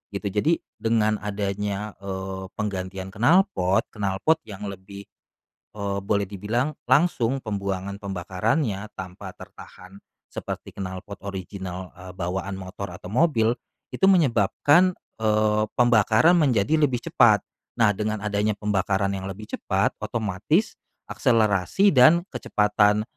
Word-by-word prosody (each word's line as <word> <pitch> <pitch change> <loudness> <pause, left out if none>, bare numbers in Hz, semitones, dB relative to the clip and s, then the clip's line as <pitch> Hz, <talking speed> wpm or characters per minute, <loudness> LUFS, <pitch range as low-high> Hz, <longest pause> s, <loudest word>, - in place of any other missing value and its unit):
gitu. 100 - -3
Jadi 155 - +1 0.2
dengan 110 -1 +1
adanya, 105 0 -3
eee, 95 -1 -5
penggantian 95 -2 -4
knalpot, 115 - +3
knalpot 105 +9 0
yang 105 -1 -8
lebih, 100 +1 -10 0.7
eee, 100 -1 -3
boleh 100 0 0
dibilang 110 +9 -2 0.2
langsung 135 -4 +3
pembuangan 100 -4 -4
pembakarannya, 100 - -2
tanpa 95 +1 -8
tertahan 95 +2 -13 0.2
seperti - - -7
knalpot 95 +1 -7
original, 95 -1 -6
eee, 90 0 -11
bawaan 95 +2 -4
motor 95 0 -7
atau 90 +1 -10
mobil, 115 - +2 0.4
itu - - -7
menyebabkan, 155 - +3 0.2
eee, 105 0 +2 0.2
pembakaran 120 - +5
menjadi 140 - +2
lebih 145 -6 +2
cepat. - - +5 0.4
Nah, 110 -3 +4
dengan 110 +1 -2
adanya 105 0 -1
pembakaran 100 -1 0
yang 95 0 -5
lebih 105 +3 -9
cepat, 100 -1 -1
otomatis 115 - 0 0.4
akselerasi 115 - +2
dan 155 +6 +6
kecepatan, 105 0 +2
105 Hz, 115 wpm, -24 LUFS, 95-115 Hz, 0.7 s, dan